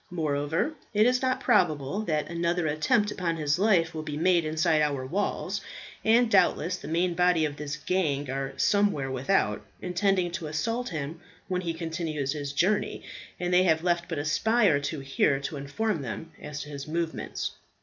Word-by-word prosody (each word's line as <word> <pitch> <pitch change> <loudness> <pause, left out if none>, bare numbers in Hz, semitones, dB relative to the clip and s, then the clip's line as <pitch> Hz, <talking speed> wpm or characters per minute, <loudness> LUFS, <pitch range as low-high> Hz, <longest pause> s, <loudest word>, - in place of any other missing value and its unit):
Moreover, 155 - -1 0.2
it 210 +1 +5
is 250 +1 +3
not 260 -1 0
probable 155 +1 +2
that 155 -4 0
another 170 0 0
attempt 205 - +2
upon 170 -3 -2
his 150 +1 0
life 180 -6 +3
will 160 - -4
be 150 -1 -5
made 170 0 +3
inside 155 0 +2
our 140 -3 0
walls; 195 +10 -2 0.4
and 235 +2 +5
doubtless 185 -4 +3
the - - -9
main 170 +3 +1
body 180 -2 +3
of 145 -1 -3
this 150 0 -4
gang 150 -5 0
are 135 +1 -3
somewhere 200 -10 +2
without, 130 +9 +1 0.2
intending 180 0 +1
to 170 -3 -4
assault 230 +11 -2
him 155 0 -5 0.3
when 180 -1 -1
he 165 -2 -3
continues 160 -4 -3
his 145 -2 -4
journey, 185 +9 0 0.4
and 180 0 -1
they 180 - +6
have 160 -3 +2
left 175 -1 0
but 165 - -3
a 145 - -2
spy 220 +9 +2
or 150 -7 +4
two 145 +1 -4
here 135 +1 +1
to 145 - -4
inform 155 +7 -2
them 140 +6 -6
as 150 0 -6
to 150 - -8
his 140 -1 -7
movements. 165 +1 -3
165 Hz, 180 wpm, -27 LUFS, 150-185 Hz, 0.4 s, they